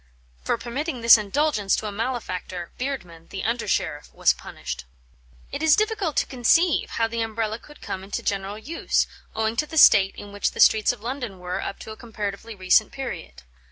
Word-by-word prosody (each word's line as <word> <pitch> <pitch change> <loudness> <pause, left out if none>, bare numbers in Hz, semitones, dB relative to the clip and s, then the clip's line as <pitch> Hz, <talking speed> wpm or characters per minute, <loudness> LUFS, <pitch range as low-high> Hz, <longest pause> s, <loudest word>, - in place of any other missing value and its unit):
For - - 0
permitting 255 +4 -4
this 230 0 +9
indulgence 215 0 +1
to - - -4
a 210 - -3
malefactor, 200 -6 -4
Beardman, 180 -12 -5
the 195 - -5
under 230 +1 -1
sheriff, 150 -6 -1
was - - +4
punished. - - -7 0.7
It - - -4
is 315 -1 +6
difficult 425 - 0
to - - +3
conceive 285 +7 +2
how 225 - +2
the 230 0 -3
Umbrella 220 0 -2
could 295 +4 -16
come 190 - -5
into 195 - -4
general 200 +1 -2
use, 305 +10 0 0.3
owing 220 0 0
to 305 - +1
the 320 - -6
state 195 -9 +7
in 205 - -10
which 205 0 -1
the - - -9
streets 215 -1 +6
of 245 -4 -10
London 240 -4 -4
were 180 0 -4
up - - -5
to 220 - -8
a - - -7
comparatively 215 -1 -6
recent 190 +3 +3
period. 65 - -7
220 Hz, 190 wpm, -24 LUFS, 195-260 Hz, 0.7 s, this